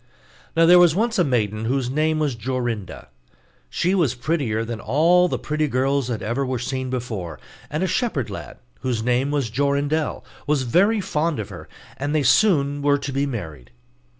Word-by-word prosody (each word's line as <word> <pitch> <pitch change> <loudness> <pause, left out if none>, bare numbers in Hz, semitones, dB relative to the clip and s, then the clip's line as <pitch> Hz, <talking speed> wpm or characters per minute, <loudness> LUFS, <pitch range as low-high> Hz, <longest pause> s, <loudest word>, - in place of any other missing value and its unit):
Now 165 - +6
there 175 +1 +8
was 175 -3 +5
once 225 +1 0
a - - +5
maiden 110 - -1
whose 130 +1 -1
name 155 +2 +1
was 150 -3 0
Jorinda. 120 - -4 0.6
She 180 - 0
was 160 -10 +1
prettier 120 -5 -1
than 115 -1 -5
all 165 +11 +3
the - - -2
pretty 155 0 -1
girls 135 0 0
that 115 -3 -3
ever 120 +5 -1
were 130 -1 -2
seen 130 +1 -3
before, 110 - -4 0.3
and 155 +4 -2
a - - +1
shepherd 170 - -1
lad, - - -8 0.2
whose 125 -4 -2
name 125 +3 +1
was 140 -6 -1
Jorindel, 140 +2 0 0.2
was 145 -3 +1
very 200 - +3
fond 160 -3 -1
of 105 -4 -5
her, - - -10 0.3
and 145 +3 -2
they 155 - +3
were 145 -3 +3
soon - - 0
to 140 - -5
be 140 +1 0
married. 80 - -6
140 Hz, 180 wpm, -22 LUFS, 120-155 Hz, 0.6 s, there